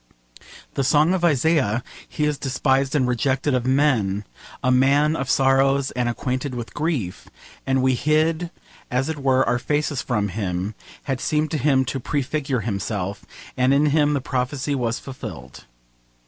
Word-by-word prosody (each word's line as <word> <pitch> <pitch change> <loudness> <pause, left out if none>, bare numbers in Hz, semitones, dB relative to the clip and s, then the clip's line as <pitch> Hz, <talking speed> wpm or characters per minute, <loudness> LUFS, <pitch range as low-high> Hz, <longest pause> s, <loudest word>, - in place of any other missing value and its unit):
The 135 - 0
song 150 +6 +4
of 185 -2 -1
Isaiah, 140 -7 +2 0.3
'He 150 - -1
is 150 -2 -1
despised 135 +1 +1
and 130 -4 +2
rejected 130 +3 0
of 125 -1 0
men, 120 -8 +2 0.4
a 130 - +3
man 140 +4 +3
of 135 -4 -3
sorrows 135 0 +3
and 125 -1 -1
acquainted 130 +2 -3
with 120 -1 -6
grief: 150 - -2 0.4
and 135 -1 +2
we 130 0 +3
hid 155 +5 +1 0.4
as 125 +4 0
it 160 -2 -3
were 130 -1 +2
our 120 0 +1
faces 145 0 -1
from 105 -5 -1
him,' 95 0 -3 0.3
had 135 -2 -3
seemed 155 0 0
to 155 - -1
him 135 -1 +3
to 130 +1 -3
prefigure 140 -1 -2
himself, 100 -2 -3 0.3
and 130 +2 +3
in 145 +2 +3
him 150 -1 +3
the 140 - -1
prophecy 130 +2 -2
was 120 -3 -1
fulfilled. 65 - -9
135 Hz, 160 wpm, -22 LUFS, 125-145 Hz, 0.4 s, song